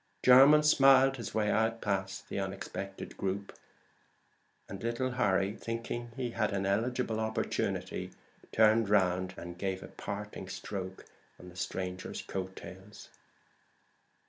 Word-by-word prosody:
Jermyn 135 Hz, +4 st, +8 dB
smiled 135 Hz, -2 st, +6 dB
his 115 Hz, -3 st, -6 dB
way 105 Hz, -1 st, +2 dB
out 115 Hz, +1 st, +1 dB
past 95 Hz, -2 st, -2 dB
the -, -, -3 dB
unexpected 95 Hz, 0 st, -6 dB
group; 100 Hz, +1 st, -3 dB, 1.1 s
and 95 Hz, -1 st, -8 dB
little 120 Hz, +3 st, -1 dB
Harry, 100 Hz, -5 st, +1 dB
thinking 115 Hz, +1 st, -4 dB
he 125 Hz, -2 st, -2 dB
had -, -, 0 dB
an 95 Hz, 0 st, -1 dB
eligible 110 Hz, +3 st, 0 dB
opportunity, 110 Hz, 0 st, -2 dB, 0.4 s
turned 110 Hz, -1 st, +4 dB
round 95 Hz, -2 st, +2 dB
to -, -, -8 dB
give 95 Hz, +1 st, -3 dB
a -, -, -8 dB
parting 100 Hz, -1 st, -6 dB
stroke 95 Hz, 0 st, -6 dB, 0.3 s
on 90 Hz, -, -11 dB
the 90 Hz, -, -15 dB
stranger's 90 Hz, 0 st, -4 dB
coat 95 Hz, 0 st, -5 dB
tails. 95 Hz, +4 st, -11 dB
100 Hz, 125 wpm, -31 LUFS, 95-115 Hz, 1.1 s, Jermyn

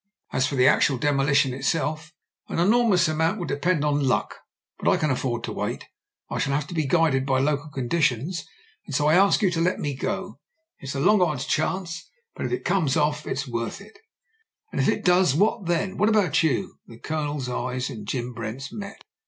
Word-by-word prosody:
As 130 Hz, 0 st, +2 dB
for 140 Hz, -, -3 dB
the 130 Hz, -1 st, +4 dB
actual 135 Hz, -, +4 dB
de 145 Hz, +4 st, +1 dB
molition 140 Hz, -1 st, +2 dB
itself, 155 Hz, +3 st, -2 dB, 0.4 s
an -, -, -4 dB
enormous 200 Hz, 0 st, +4 dB
amount 160 Hz, +5 st, +1 dB
will 175 Hz, -, -4 dB
depend 150 Hz, +1 st, 0 dB
on 145 Hz, -1 st, +1 dB
luck; 130 Hz, -, 0 dB, 0.4 s
but -, -, +1 dB
I -, -, +4 dB
can 155 Hz, -2 st, 0 dB
afford 125 Hz, -2 st, -2 dB
to -, -, -4 dB
wait -, -, -4 dB, 0.4 s
I -, -, -4 dB
shall 140 Hz, -, 0 dB
have 145 Hz, 0 st, -1 dB
to -, -, -6 dB
be 155 Hz, -4 st, 0 dB
guided 155 Hz, -4 st, +2 dB
by 135 Hz, -1 st, +1 dB
local 145 Hz, +2 st, 0 dB
conditions. 145 Hz, +3 st, -1 dB, 0.4 s
And 145 Hz, -, -4 dB
so 145 Hz, -, +2 dB
I 155 Hz, -, +4 dB
ask 195 Hz, +4 st, +4 dB
you 190 Hz, -, +3 dB
to 165 Hz, -1 st, -1 dB
let 180 Hz, +2 st, +1 dB
me 145 Hz, -2 st, -2 dB
go. -, -, -4 dB, 0.4 s
It's 140 Hz, +1 st, -6 dB
a -, -, -1 dB
long 205 Hz, +7 st, +4 dB
odds 150 Hz, -6 st, 0 dB
chance, 165 Hz, +2 st, -2 dB, 0.2 s
but -, -, -3 dB
if -, -, -7 dB
it 370 Hz, -, -3 dB
comes 165 Hz, -7 st, +1 dB
off 150 Hz, 0 st, 0 dB
it's 135 Hz, +1 st, -3 dB
worth 115 Hz, -1 st, -3 dB
it" 205 Hz, -, -15 dB, 0.7 s
"And -, -, -1 dB
if -, -, +2 dB
it -, -, -1 dB
does, 180 Hz, -5 st, +4 dB
what 205 Hz, +1 st, +1 dB
then? 185 Hz, +3 st, -1 dB
What 210 Hz, -, +3 dB
about 195 Hz, -8 st, +3 dB
you?" 155 Hz, -6 st, -1 dB
The 115 Hz, -, -12 dB
O)loners 145 Hz, -1 st, -3 dB
eyes 125 Hz, 0 st, -3 dB
and 110 Hz, -, -8 dB
Jim 125 Hz, -1 st, -3 dB
Brent's 115 Hz, +4 st, -6 dB
met. 200 Hz, -2 st, -8 dB
150 Hz, 210 wpm, -24 LUFS, 135-175 Hz, 0.7 s, the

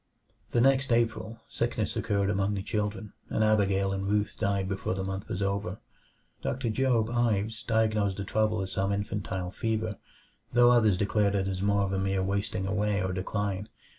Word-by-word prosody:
The 120 Hz, -, +2 dB
next 135 Hz, 0 st, +3 dB
April, 115 Hz, -1 st, 0 dB
sickness 115 Hz, -3 st, -2 dB
occurred 100 Hz, -2 st, +1 dB
among 100 Hz, 0 st, 0 dB
the 95 Hz, -, -3 dB
children, 105 Hz, 0 st, -3 dB, 0.2 s
and 110 Hz, -, +1 dB
Abigail 100 Hz, -2 st, +2 dB
and 95 Hz, 0 st, -2 dB
Ruth 105 Hz, 0 st, 0 dB
died 100 Hz, -3 st, 0 dB
before 95 Hz, -1 st, -2 dB
the 95 Hz, -, -3 dB
month 95 Hz, +1 st, -4 dB
was 95 Hz, -, -2 dB
over. 100 Hz, 0 st, -2 dB, 0.6 s
Doctor 125 Hz, -3 st, -1 dB
Job 120 Hz, -2 st, +2 dB
Ives 110 Hz, -2 st, 0 dB
diagnosed 110 Hz, -4 st, +1 dB
the 100 Hz, -, -3 dB
trouble 110 Hz, 0 st, +1 dB
as 95 Hz, -, -6 dB
some 95 Hz, +1 st, 0 dB
infantile 95 Hz, -3 st, -3 dB
fever, 110 Hz, -1 st, -2 dB, 0.5 s
though 120 Hz, 0 st, +6 dB
others 110 Hz, -6 st, +4 dB
declared 100 Hz, 0 st, +1 dB
it 95 Hz, -1 st, +1 dB
was 95 Hz, -1 st, -2 dB
more 100 Hz, 0 st, +2 dB
of 95 Hz, 0 st, -1 dB
a 95 Hz, -, 0 dB
mere 95 Hz, 0 st, 0 dB
wasting 100 Hz, 0 st, -1 dB
away 105 Hz, +1 st, 0 dB
or 95 Hz, 0 st, -1 dB
decline. 100 Hz, +1 st, -2 dB
100 Hz, 175 wpm, -29 LUFS, 95-110 Hz, 0.6 s, though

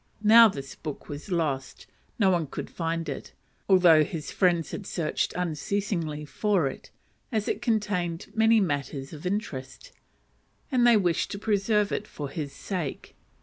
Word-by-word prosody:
Now 225 Hz, +2 st, +9 dB
this 135 Hz, -7 st, -7 dB
book 150 Hz, -3 st, -7 dB
was 145 Hz, +5 st, -7 dB
lost: 150 Hz, -7 st, -2 dB, 0.3 s
no 195 Hz, -4 st, +4 dB
one 170 Hz, -4 st, +1 dB
could -, -, -6 dB
find 165 Hz, 0 st, -2 dB
it; -, -, -6 dB, 0.4 s
although 175 Hz, -5 st, +7 dB
his 155 Hz, -1 st, -5 dB
friends 175 Hz, -4 st, +2 dB
had 200 Hz, -, -6 dB
searched 160 Hz, -4 st, -1 dB
unceasingly 170 Hz, -2 st, -2 dB
for 195 Hz, +1 st, +1 dB
it, 135 Hz, -, -5 dB, 0.4 s
as 215 Hz, -3 st, -1 dB
it -, -, -1 dB
contained 205 Hz, -8 st, -1 dB
many 225 Hz, 0 st, +4 dB
matters 145 Hz, -6 st, -2 dB
of 155 Hz, +3 st, -6 dB
interest, 135 Hz, -10 st, -4 dB, 0.8 s
and 245 Hz, -2 st, +4 dB
they 235 Hz, -2 st, +7 dB
wished 175 Hz, -5 st, +1 dB
to -, -, -4 dB
preserve 210 Hz, 0 st, +1 dB
it 210 Hz, -, -2 dB
for 145 Hz, -2 st, -6 dB
his 145 Hz, -2 st, -4 dB
sake. 175 Hz, -5 st, -5 dB
175 Hz, 150 wpm, -27 LUFS, 150-205 Hz, 0.8 s, Now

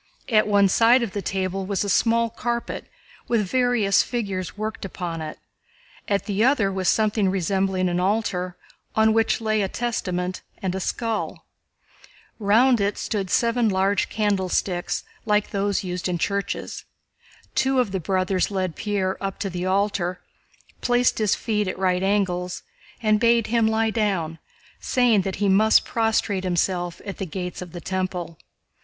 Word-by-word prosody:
At 215 Hz, -3 st, +4 dB
one 200 Hz, -1 st, +4 dB
side 235 Hz, +5 st, +5 dB
of 225 Hz, -, -3 dB
the 205 Hz, -, -3 dB
table 190 Hz, 0 st, -2 dB
was 200 Hz, 0 st, 0 dB
a -, -, -3 dB
small 230 Hz, +3 st, +2 dB
carpet 235 Hz, +1 st, -3 dB, 0.4 s
with 225 Hz, -3 st, +1 dB
various 245 Hz, -3 st, +3 dB
figures 200 Hz, -7 st, -3 dB
worked 215 Hz, +1 st, -4 dB
upon 175 Hz, -3 st, -5 dB
it, 155 Hz, -1 st, -6 dB, 0.7 s
at 200 Hz, -1 st, 0 dB
the 205 Hz, 0 st, 0 dB
other 240 Hz, -7 st, +3 dB
was 190 Hz, -2 st, 0 dB
something 215 Hz, -2 st, +2 dB
resembling 190 Hz, 0 st, 0 dB
an 175 Hz, 0 st, 0 dB
altar 185 Hz, -2 st, -1 dB, 0.4 s
on 220 Hz, 0 st, +4 dB
which 225 Hz, +1 st, +2 dB
lay 215 Hz, -1 st, +1 dB
a 195 Hz, -, +1 dB
Testament 185 Hz, -5 st, -2 dB, 0.2 s
and 190 Hz, -2 st, -2 dB
a 190 Hz, -, -2 dB
skull. 225 Hz, +3 st, -3 dB, 0.9 s
Round 225 Hz, +3 st, +4 dB
it 200 Hz, +1 st, 0 dB
stood 200 Hz, -4 st, -2 dB
seven 235 Hz, +1 st, +2 dB
large 195 Hz, +1 st, +1 dB
candlesticks 190 Hz, -3 st, 0 dB, 0.2 s
like 210 Hz, 0 st, +2 dB
those 200 Hz, -1 st, 0 dB
used 180 Hz, 0 st, -3 dB
in 175 Hz, -, 0 dB
churches. 200 Hz, +3 st, -3 dB, 0.7 s
Two 265 Hz, 0 st, +2 dB
of 240 Hz, -6 st, +1 dB
the 190 Hz, -, -1 dB
brothers 185 Hz, +2 st, 0 dB
led 185 Hz, -4 st, -2 dB
Pierre 200 Hz, -2 st, -2 dB
up 195 Hz, -1 st, -3 dB
to 195 Hz, -3 st, -2 dB
the 180 Hz, +1 st, -3 dB
altar, 190 Hz, -2 st, 0 dB, 0.6 s
placed 245 Hz, -1 st, +2 dB
his 215 Hz, -2 st, +2 dB
feet 210 Hz, -2 st, -1 dB
at 185 Hz, -, -3 dB
right 185 Hz, -1 st, +1 dB
angles, 185 Hz, -2 st, 0 dB, 0.4 s
and 215 Hz, -1 st, +3 dB
bade 235 Hz, 0 st, +4 dB
him 230 Hz, -2 st, +4 dB
lie 220 Hz, 0 st, +1 dB
down, 190 Hz, -8 st, -1 dB, 0.4 s
saying 245 Hz, -5 st, +3 dB
that 190 Hz, 0 st, -3 dB
he 205 Hz, +1 st, 0 dB
must 215 Hz, +3 st, +5 dB
prostrate 225 Hz, -4 st, 0 dB
himself 175 Hz, -1 st, -1 dB
at 200 Hz, -, -6 dB
the 195 Hz, -, -2 dB
Gates 180 Hz, +2 st, -5 dB
of 180 Hz, -2 st, -8 dB
the 175 Hz, -, -8 dB
Temple. 185 Hz, -3 st, -3 dB
200 Hz, 160 wpm, -24 LUFS, 185-220 Hz, 0.9 s, side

